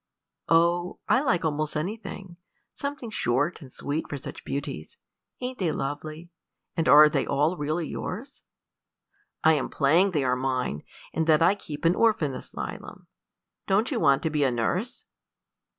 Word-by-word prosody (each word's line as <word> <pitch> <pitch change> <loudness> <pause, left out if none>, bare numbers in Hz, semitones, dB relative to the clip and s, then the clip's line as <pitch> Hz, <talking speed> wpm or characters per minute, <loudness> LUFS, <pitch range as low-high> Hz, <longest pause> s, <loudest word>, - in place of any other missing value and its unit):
"Oh, 170 +2 +3
I 260 - +4
like 180 - +1
almost 155 0 -1
anything 190 +1 -5 0.4
something 280 -5 -5
short 145 - 0
and 135 -3 -12
sweet 145 +5 -4
for 145 - -3
such 135 - -9
beauties. 140 - -5 0.4
Ain't 250 0 -4
they 175 -5 +1
lovely? 155 +5 -5 0.4
and 165 - +1
are 150 +1 +9
they 145 -3 0
all 150 +5 +2
really 155 +1 -2
yours?" 245 - -6 1.0
"I'm 155 -4 +3
playing 165 +8 +3
they 155 -7 0
are 125 -1 +2
mine, 130 - -1 0.3
and 160 0 0
that 155 0 +5
I 180 - +5
keep 155 -7 -8
an 165 - +5
orphan 185 -11 +2
asylum. 130 - -7 0.6
Don't 205 +7 +2
you 250 - 0
want 140 -5 +3
to 160 - 0
be 150 -1 +1
a 135 - +3
nurse?" 150 - -2
160 Hz, 150 wpm, -26 LUFS, 145-185 Hz, 1.0 s, are